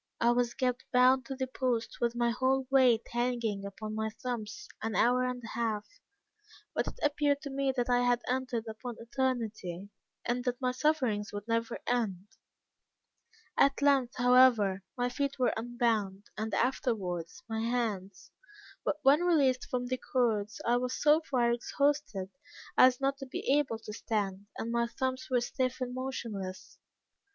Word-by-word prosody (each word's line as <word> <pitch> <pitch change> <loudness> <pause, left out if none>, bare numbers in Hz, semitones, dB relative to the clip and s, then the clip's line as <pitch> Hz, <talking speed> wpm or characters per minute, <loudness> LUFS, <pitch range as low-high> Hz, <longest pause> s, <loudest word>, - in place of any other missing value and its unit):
I 235 - +4
was 240 0 +1
kept 250 -1 0
bound 255 0 +4
to 270 - -4
the 260 0 -1
post 250 -3 -2
with 235 0 +1
my 240 0 +2
whole 260 +2 +1
weight 250 -4 +5
hanging 235 -4 -1
upon 215 +2 -6
my 220 0 -1
thumbs, 220 -2 -5
an 225 -1 -2
hour 250 +1 +4
and 250 -1 -3
a 225 - -7
half, 220 -3 -2 0.9
but - - -1
it - - -6
appeared 290 -1 +2
to 280 - -5
me 275 0 +1
that 245 - +1
I 245 0 +3
had 245 -1 +2
entered 250 -3 -1
upon 225 +2 -6
eternity, 225 -7 -3 0.4
and 245 +1 -1
that 250 0 -1
my 255 -1 +1
sufferings 255 -7 0
would 205 +1 -6
never 230 0 -1
end. 210 -7 -1 1.3
At 275 0 +4
length, 270 -4 +3
however, 245 -6 +5 0.2
my 245 0 +1
feet 280 +2 -2
were 255 -2 +2
unbound, 225 -4 -1
and 220 +1 -3
afterwards 225 - -1
my 225 -1 -3
hands; 210 -5 -2 0.5
but 295 - 0
when 280 +4 +6
released 280 -8 +3
from 250 -1 -1
the 255 +1 -1
cords, 220 -5 0
I 240 +1 +3
was 250 +1 -2
so 300 +2 +5
far 240 -3 +2
exhausted 240 -5 0 0.4
as 255 -1 +6
not 275 0 0
to 270 - -7
be 255 - -4 0.2
able 265 -6 -1
to 215 -1 -9
stand, 205 -3 -2
and 230 - -3
my 235 0 +1
thumbs 260 +2 -3
were 250 -2 +2
stiff 255 +1 -1
and 250 -1 -3
motionless. 220 -8 -5
245 Hz, 160 wpm, -31 LUFS, 220-260 Hz, 1.3 s, when